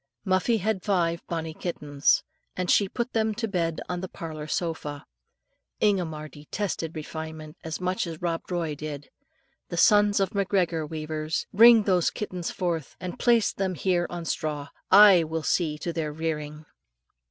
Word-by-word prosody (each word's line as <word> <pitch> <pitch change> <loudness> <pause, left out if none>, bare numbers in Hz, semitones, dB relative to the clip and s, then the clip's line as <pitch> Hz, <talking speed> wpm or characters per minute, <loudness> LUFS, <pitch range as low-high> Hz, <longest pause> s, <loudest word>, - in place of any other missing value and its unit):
Muffie 190 +5 +2
had 215 -1 -1
five 170 -4 0
bonnie 165 -2 -3
kittens, 145 -4 0 0.3
and 180 -1 0
she 200 -2 +4
put 240 +3 -3
them 220 -1 +1
to 225 +1 -2
bed 170 -5 -1
on 180 -1 -3
the 190 - -4
parlour 155 -2 -7
sofa. 155 -3 -3 0.7
Ingomar 170 -7 0
detested 165 +2 -4
refinement 160 0 -7
as 160 -1 -4
much 185 0 -1
as 165 -2 -6
Rob 170 -1 -1
Roy 170 -4 -1
did. 145 -1 -7 0.6
"The 170 - -4
sons 205 +3 +5
of 195 -2 +1
McGregor, 180 -6 0
weavers! 155 0 -3
Bring 230 +1 +8
those 185 -4 +2
kittens 180 -5 -4
forth, 170 -5 -3
and 180 -1 -6
place 235 -3 +3
them 190 -2 -2
here 175 0 +1
on 175 -1 -6
straw; 150 -2 -3 0.2
I 195 -3 +8
will 160 0 -3
see 155 -3 0
to 170 +3 -4
their 155 -2 -2
rearing." 150 -1 -4
170 Hz, 155 wpm, -26 LUFS, 155-190 Hz, 0.7 s, Bring